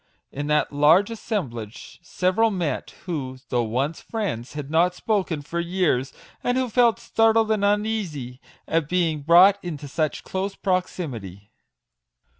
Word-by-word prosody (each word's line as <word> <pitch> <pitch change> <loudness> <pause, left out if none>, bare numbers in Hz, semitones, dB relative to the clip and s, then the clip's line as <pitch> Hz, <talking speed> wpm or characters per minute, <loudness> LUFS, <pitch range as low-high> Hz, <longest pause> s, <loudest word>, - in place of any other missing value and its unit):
In 145 +1 -4
that 150 0 +1
large 160 +9 +4
assemblage 125 - -5
several 185 +6 +1
met, 180 -7 -2 0.2
who, 140 -8 -4
though 120 - +1
once 135 +8 -2
friends, 185 - -4
had 150 -1 -6
not 175 +3 +3
spoken 185 -9 -1
for 170 +4 -4
years, 170 -7 0 0.3
and 245 +1 +1
who 260 -1 0
felt 235 0 +4
startled 225 -1 +2
and 215 -2 +1
uneasy 200 - -1 0.3
at 160 -3 0
being 165 -4 +1
brought 180 +6 +6
into 155 -5 -6
such 155 +2 -2
close 195 +1 -3
proximity. 120 - -3
170 Hz, 135 wpm, -24 LUFS, 145-200 Hz, 0.3 s, brought